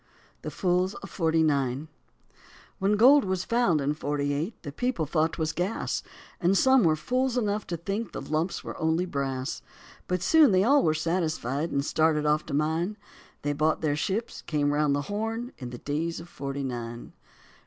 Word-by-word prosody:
THE - - -4
FOOLS 180 +1 0
OF 195 - -9
FORTY 160 -2 +2
NINE 140 -1 0 0.9
When 195 +2 +2
gold 270 +5 +7
was 185 -1 -1
found 230 -9 +2
in 140 +1 0
forty 145 -1 -1
eight 160 +10 -3
the 145 - -5
people 240 - -1
thought 155 +2 +1
'twas 160 -1 -2
gas, 185 +5 -2 0.4
And 190 +2 +3
some 265 0 +5
were 160 -2 +4
fools 255 +10 0
enough 210 -3 -1
to 170 - -3
think 200 +7 -3
the - - -5
lumps 160 +4 -2
were - - -6
only 160 +3 +1
brass. 135 -4 -3 0.5
But 180 -1 -1
soon 310 -5 +6
they 185 +1 +4
all 280 +6 +5
were 155 -1 +2
satisfied 155 -3 -1
and 140 -2 -1
started 155 -1 +2
off 150 +1 +1
to - - -5
mine; 160 +7 0 0.5
They 145 0 0
bought 155 +2 +1
their 150 -2 +1
ships, 200 +9 -2
came 145 -2 +1
round 145 -1 +2
the 145 - -1
Horn, 225 - -3
in 125 - -6
the 120 - -7
days 155 +6 -3
of 165 - -10
forty 140 -3 -5
nine. 120 -2 -6
160 Hz, 185 wpm, -27 LUFS, 145-195 Hz, 0.9 s, gold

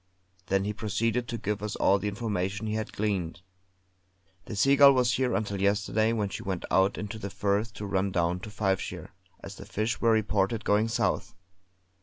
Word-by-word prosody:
Then 95 0 +1
he 105 +1 -2
proceeded 115 +3 -1
to 115 - -4
give 105 -1 -3
us 105 -1 -3
all 100 +1 +3
the 105 - -3
information 100 -1 -2
he 105 - -2
had 110 -1 -3
gleaned. 95 -5 -2 1.0
"The 110 - -6
Seagull 140 +5 +6
was 125 -2 +2
here 130 -2 +1
until 100 -3 -2
yesterday 105 +2 +2
when 105 -3 -1
she - - -6
went 95 -2 -4
out 95 +1 +3
into 105 +1 -5
the 100 - -5
Firth 100 +3 -1
to 105 - -6
run 100 0 0
down 90 0 0
to 105 - -8
Fifeshire, 95 -3 -2 0.3
as - - -9
the - - -9
fish 110 +3 -2
were 115 - +3
reported 110 0 +1
going 105 +2 +3
south. 115 +1 -1
105 Hz, 185 wpm, -28 LUFS, 100-110 Hz, 1.0 s, Seagull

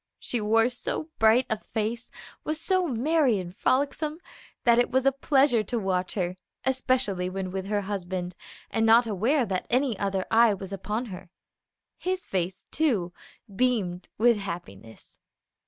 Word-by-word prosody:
She 240 - -3
wore 225 +2 +3
so 275 +5 -4
bright 225 +3 +5
a 220 - -1
face, 225 +2 -3 0.3
was 310 0 -2
so 370 +1 +1
merry 270 -1 +2
and 180 -1 -6
frolicsome, 290 +6 0 0.5
that 235 -2 +5
it 245 - +3
was 260 +1 +1
a 275 - +6
pleasure 270 -3 +3
to 235 +3 -3
watch 185 -3 -1
her, 180 -2 -2 0.3
especially 255 -8 0
when 185 0 -4
with 190 0 -4
her 205 0 0
husband, 185 -2 -4 0.4
and 225 - +1
not 225 +2 +6
aware 230 +6 +1
that 190 -3 -3
any 255 -1 +2
other 195 -2 -1
eye 225 -2 +5
was 195 0 -8
upon 210 +5 -3
her. 180 0 -10 0.7
His 370 +1 -2
face, 185 0 -2
too, 220 - +1 0.4
beamed 200 -7 0
with 235 +1 +4
happiness. 170 - -8
220 Hz, 155 wpm, -27 LUFS, 190-255 Hz, 0.7 s, a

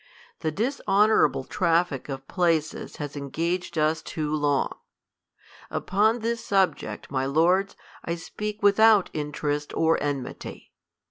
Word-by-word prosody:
The 160 - -1
dishonorable 215 - +2
traffic 165 -3 0
of 135 0 -6
pieces 165 -4 0
has 145 -1 -6
engaged 165 +5 -3
us 155 +1 +2
too 155 -1 -3
long. 145 -2 +1 1.0
Upon 220 +5 +1
this 230 +1 -2
subject, 195 -7 0
my 135 -1 0
lords, 180 +7 +2 0.3
I 170 - -2
speak 210 +5 -6
without 205 0 +5
interest 150 0 -3
or 160 0 +2
enmity. 140 -3 -5
165 Hz, 115 wpm, -25 LUFS, 145-200 Hz, 1.0 s, without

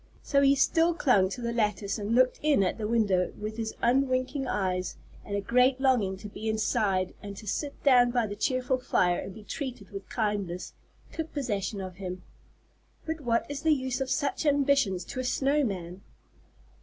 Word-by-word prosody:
So 280 -1 +2
he 275 0 +5
still 330 +5 +3
clung 205 - +3
to 245 - -6
the 235 0 -2
lattice 210 -2 -1
and 210 +3 -1
looked 255 0 +3
in 295 -9 +3
at 185 - -1
the 210 - -2
window 205 -6 +2
with 215 +1 -5
his 220 -1 -3
unwinking 255 +2 +1
eyes; 185 -4 -1 0.3
and 200 - -4
a 200 - 0
great 250 +5 +3
longing 240 -8 +2
to 210 - -8
be 215 +2 -5
inside, 210 -4 0
and 200 -1 -8
to 215 - -9
sit 280 +7 -4
down 250 -3 +6
by 240 -1 +1
the 205 -1 -5
cheerful 255 +3 0
fire 180 -7 +1
and 195 - -7
be 220 - -11
treated 250 -5 -6
with 195 -1 -8
kindness, 205 -6 -2 0.4
took 320 -1 -5
possession 210 -7 -2
of 185 -1 -7
him. 185 -2 -6 0.8
But 320 -1 -3
what 235 -3 +1
is 285 0 -5
the 315 0 +4
use 260 -1 -3
of 265 - -2
such 285 +2 -1
ambitions 275 - +2
to 255 - -6
a - - -1
snow 275 +3 +1
man? 185 -5 -4
235 Hz, 190 wpm, -28 LUFS, 200-270 Hz, 0.8 s, down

